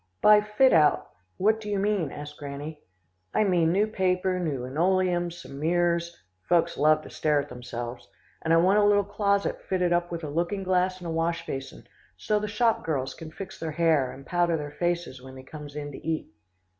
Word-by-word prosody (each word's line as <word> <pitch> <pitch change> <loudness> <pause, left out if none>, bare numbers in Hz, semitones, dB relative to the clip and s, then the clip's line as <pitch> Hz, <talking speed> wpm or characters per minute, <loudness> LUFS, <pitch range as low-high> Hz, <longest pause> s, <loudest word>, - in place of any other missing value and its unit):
"'By 210 0 +8
fit 210 +5 +3
out, 150 -2 +3 0.3
what 220 +3 +2
do 210 - -6
you 205 - 0
mean?' 195 -6 0
asked 150 0 -8
Granny. 145 +2 -7 0.5
"'I - - +4
mean 175 -5 +3
new 200 +4 +3
paper, 185 -3 0
new 145 -8 -2
linoleum, 175 +5 +1
some 165 -5 -10
mirrors 170 +1 0 0.3
folks 170 -1 +3
love 155 +1 +3
to - - -11
stare 150 -1 +1
at 145 0 -4
themselves, 120 0 -7 0.3
and 160 - -1
I 165 - +6
want 190 +5 +4
a - - +4
little 205 0 +4
closet 200 0 0
fitted 180 -2 0
up 175 0 0
with 170 -1 -5
a - - -3
looking 175 +6 -1
glass 185 0 +1
and 180 - -11
a - - -3
wash 165 +1 -1
basin, 135 - -6 0.3
so 210 - 0
the 210 - -3
shop 225 +2 +1
girls 135 -4 -2
can 160 - -9
fix 190 +4 -9
their 165 - -3
hair, 155 -5 +2
and 135 - -12
powder 175 -2 +1
their 145 -1 -6
faces 175 -5 -2
when 130 0 -11
they 130 - -10
comes 145 +1 -10
in 145 -1 -5
to - - -9
eat. 160 -1 -3
170 Hz, 205 wpm, -27 LUFS, 150-190 Hz, 0.5 s, By